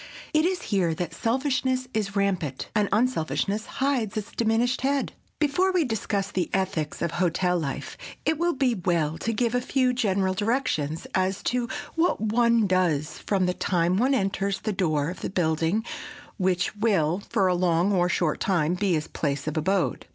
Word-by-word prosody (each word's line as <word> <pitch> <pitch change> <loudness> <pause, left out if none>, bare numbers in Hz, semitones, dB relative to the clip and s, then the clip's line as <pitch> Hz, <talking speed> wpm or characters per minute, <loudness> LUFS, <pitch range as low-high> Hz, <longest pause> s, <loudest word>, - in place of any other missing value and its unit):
It 310 +1 +4
is 365 0 0
here 175 -5 +2
that 170 0 -4
selfishness 255 - 0
is 210 -2 -2
rampant, 185 -9 -1
and 210 -2 +2
unselfishness 205 - 0
hides 260 -7 0
its 215 0 -4
diminished 235 +2 +1
head. 275 +1 0 0.2
Before 315 +6 +2
we 365 -3 +2
discuss 205 -5 -2
the 180 -3 -1
ethics 170 -6 -1
of 170 - 0
hotel 180 +1 +1
life 140 -4 -5 0.3
it 315 -1 +1
will 345 0 +2
be 260 -2 +2
well 165 -5 0
to 230 - -1
give 235 +1 0
a 245 - +1
few 255 0 +1
general 195 -6 +1
directions 190 - -1
as 185 0 0
to 245 -1 0 0.2
what 330 +2 +1
one 230 +1 +3
does 175 -6 +1
from 195 -3 0
the 180 - +1
time 175 0 +1
one 260 +5 +3
enters 195 -2 -1
the 215 - -2
door 155 -5 0
of 180 - -10
the - - -3
building 170 +3 0 0.5
which 180 -1 0
will, 190 -5 +1
for 210 -5 +2
a 185 - +3
long 175 +1 +2
or 180 -1 +2
short 170 -3 0
time, 175 -4 +1
be 185 0 +1
his 155 -2 -1
place 140 -2 -2
of 155 - -3
abode. 185 +4 0
195 Hz, 175 wpm, -26 LUFS, 175-235 Hz, 0.5 s, It